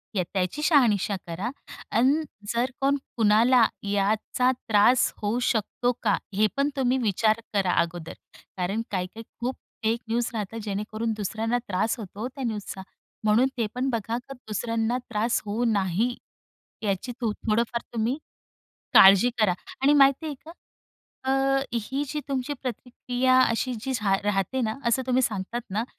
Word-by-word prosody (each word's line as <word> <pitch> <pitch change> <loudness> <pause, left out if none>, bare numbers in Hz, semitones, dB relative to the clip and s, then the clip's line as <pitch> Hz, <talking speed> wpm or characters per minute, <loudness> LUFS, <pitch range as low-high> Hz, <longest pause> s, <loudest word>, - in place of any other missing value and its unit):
या 185 - +2
त्याची 190 +8 -1
शहानिशा 225 - +3
करा 185 +8 -3 0.5
आणि 275 +7 +3 0.3
जर 245 +2 0
कोण 280 +1 +3 0.2
कुणाला 225 +3 +5 0.2
याचा 210 +5 +1
त्रास 240 0 +3
होऊ 215 +4 0
शकतो 240 +2 0
का? 205 -3 +3 0.2
हे 215 +3 +3
पण 280 +1 +2
तुम्ही 260 -1 +2
विचार 220 -1 +2
करा 190 -3 +2
अगोदर. 170 -1 -5 0.4
कारण 195 +5 -1
काही-काही 190 +4 -4 0.2
खूप 250 +2 -2 0.3
फेक 225 +2 +1
न्यूज 235 +1 0
राहतात 225 0 -4
जेणेकरून 215 +2 -2
दुसऱ्यांना 220 +4 -1
त्रास 205 +6 0
होतो 210 +3 -6
त्या 265 0 -7
न्यूजचा. 205 -3 -5 0.4
म्हणून 215 +5 +4
ते 230 - +1
पण 255 +2 0
बघा 230 -1 -2
का 260 +2 -9
दुसऱ्यांना 230 0 -2
त्रास 230 +2 0
होऊ 220 +4 -1
नाही. 205 +4 0 0.7
याची 200 +4 -1
तूम 225 -2 +1 0.2
थोडंफार 230 +2 +1
तुम्ही 235 +4 0 0.8
काळजी 195 +6 +8
करा. 200 -5 +3 0.3
आणि 280 - +5
माहिती 275 +2 +5
आहे 295 - -3
का? 330 - -9 0.7
अ, 270 0 +2
ही 265 +5 -2
जी 300 +2 -3
तुमची 275 +1 -2
प्रतिक्रिया 255 +1 0
अशी 245 +1 0
जी 265 +3 -3
झा 210 -5 +1
राहते 205 +6 0
ना, 220 -2 0
असं 235 +3 +2
तुम्ही 255 0 +2
सांगतात 225 +1 -2
ना. 215 +4 -1
230 Hz, 150 wpm, -26 LUFS, 210-255 Hz, 0.8 s, काळजी